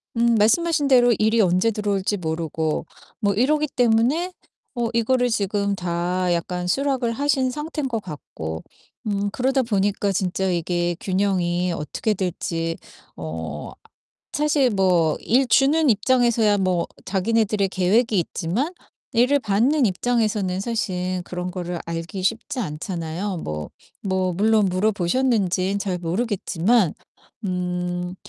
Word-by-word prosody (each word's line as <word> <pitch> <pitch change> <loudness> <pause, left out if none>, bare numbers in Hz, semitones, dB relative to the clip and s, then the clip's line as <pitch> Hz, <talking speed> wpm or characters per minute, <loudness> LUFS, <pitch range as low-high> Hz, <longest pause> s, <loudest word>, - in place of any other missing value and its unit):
음 235 0 +3
말씀하신 290 +8 +3
대로 245 -2 +5
일이 220 +1 +3
언제 185 +3 +3
들어올지 205 -1 -1
모르고 160 -2 -2 0.3
뭐 205 -3 +1
이러기 300 +8 +2
때문에 245 +10 +2 0.5
어 235 -1 0
이거를 245 +2 +2
지금 200 -1 0
다 180 0 -1
약간 180 +1 -2
수락을 270 0 0
하신 275 0 +1
상태인 300 +1 -3
것 225 -4 -2
같고 80 - -7 0.5
음 205 -1 0
그러다 265 +3 +1
보니까 205 -2 0
진짜 190 0 -1
이게 175 0 0
균형이 180 -2 0
어떻게 160 +8 -2
될지 165 -3 -2 0.4
어 80 -1 -6 0.6
사실 290 -3 +2
뭐 180 -6 +2
일 260 +4 +3
주는 290 +4 +4
입장에서야 230 -1 +3
뭐 185 -3 0 0.2
자기네들의 205 +1 +1
계획이 200 +5 +2
있지만 195 - -2 0.4
일을 250 +5 +4
받는 250 +6 +2
입장에서는 210 -3 0
사실 185 -5 -2
그런 180 0 -4
거를 175 -2 -4
알기 170 +3 -5
쉽지 230 +5 -1
않잖아요. 170 +1 -4
뭐, 75 - -5 0.3
뭐 190 -2 0
물론 215 +3 +3
물어보셨는진 195 0 +1
잘 190 -2 -2
모르겠지만. 190 +1 +1 0.5
음 180 0 -2
200 Hz, 270 characters per minute, -23 LUFS, 180-235 Hz, 0.6 s, 대로